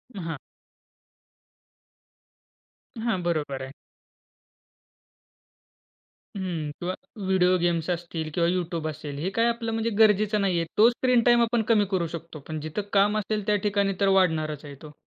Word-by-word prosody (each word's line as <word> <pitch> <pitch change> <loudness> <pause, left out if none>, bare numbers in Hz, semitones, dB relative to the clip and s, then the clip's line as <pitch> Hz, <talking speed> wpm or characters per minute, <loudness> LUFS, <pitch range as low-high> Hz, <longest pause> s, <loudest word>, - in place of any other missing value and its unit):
हां. 165 -5 -4 2.6
हां, 225 -5 0
बरोबर 150 -6 -2
आहे. 130 0 -7 2.6
हं. 170 -6 -3
किंवा 180 +1 -2 0.3
व्हिडिओ 185 -1 +3
गेम्स 170 -1 0
असतील 170 -2 -3
किंवा 170 0 +2
YouTube 170 -3 -2
असेल 150 -2 -7
हे 175 +5 -1
काय 230 - +3
आपलं 235 -1 -1
म्हणजे 225 +1 -1
गरजेचं 210 -1 +4
नाही 190 -3 +1
आहे. 165 - -1
तो 220 +3 +7
स्क्रीन 245 0 +2
टाईम 240 0 +5
आपण 235 0 +2
कमी 210 -2 +3
करू 180 -3 0
शकतो. 165 -1 -9
पण 155 -1 -4
जिथं 155 +7 -3
काम 205 +1 +4
असेल, 210 0 -2
त्या 210 - +3
ठिकाणी 200 -1 +1
तर 200 - +3
वाढणारच 155 -5 +1
आहे 145 -1 -9
तो. 150 -1 -11
185 Hz, 145 wpm, -26 LUFS, 160-210 Hz, 2.6 s, तो